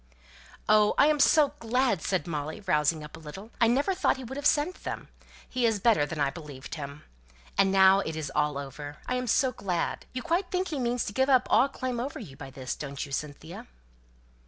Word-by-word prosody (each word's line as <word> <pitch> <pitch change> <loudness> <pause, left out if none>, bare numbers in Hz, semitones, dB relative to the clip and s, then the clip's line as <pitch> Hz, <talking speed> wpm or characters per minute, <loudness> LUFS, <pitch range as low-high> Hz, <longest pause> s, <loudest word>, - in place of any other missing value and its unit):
"Oh, 210 0 +5
I - - +6
am 300 0 +3
so 295 0 +5
glad!" 235 -5 +1
said 185 -3 -1
Molly, 155 +1 -4
rousing 150 -2 +2
up 150 - -10
a - - -11
little. 190 +8 -10
"I 230 - +6
never 280 +11 +2
thought 370 - +1
he 260 - -8
would 255 +2 -7
have 285 +1 +1
sent 305 +5 +1
them. - - -5 0.4
He 255 -1 -2
is 225 -3 +2
better 205 -9 +3
than 160 - -5
I 140 -1 +2
believed 145 -3 -9
him. 145 -1 -7 0.5
And 195 - +4
now 190 0 +6
it 160 -5 -3
is 155 -3 -4
all 150 -1 +1
over. 145 +1 -7
I - - -2
am 250 0 -2
so 260 +3 +3
glad! 180 -7 -3
You 255 - -5
quite 345 +2 0
think 370 0 -1
he 300 -4 -3
means 245 -1 0
to 205 - -5
give 265 +5 +2
up 255 -2 +5
all 275 - +5
claim 255 -3 -3
over 270 +4 -4
you 165 - -9
by 135 0 -9
this, 130 -1 -5
don't 140 -2 -5
you, 140 - -12
Cynthia?" 150 +3 -6
195 Hz, 220 wpm, -28 LUFS, -, 0.5 s, I